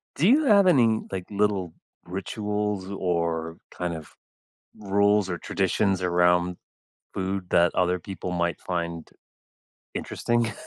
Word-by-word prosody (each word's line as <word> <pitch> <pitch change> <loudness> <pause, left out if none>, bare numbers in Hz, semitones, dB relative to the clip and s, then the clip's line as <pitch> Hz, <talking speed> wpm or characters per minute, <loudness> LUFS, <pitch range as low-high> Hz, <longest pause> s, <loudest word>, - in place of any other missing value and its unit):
Do 170 - +2
you 290 +5 +5
have 200 -5 +6
any, 115 -10 +4
like, 95 -2 -4
little 100 -4 0 0.3
rituals 105 +1 -3
or, 85 -3 -1
kind 90 -1 -3
of, 80 -2 -9 0.6
rules 100 0 +2
or 90 - -2
traditions 95 +1 0
around 90 0 +2 0.6
food 95 0 -3
that 85 0 +4
other 90 0 +2
people 95 0 -6
might 85 -1 -1
find 85 -2 -4 0.9
interesting, 120 -1 -1
95 Hz, 120 wpm, -26 LUFS, 90-105 Hz, 0.9 s, have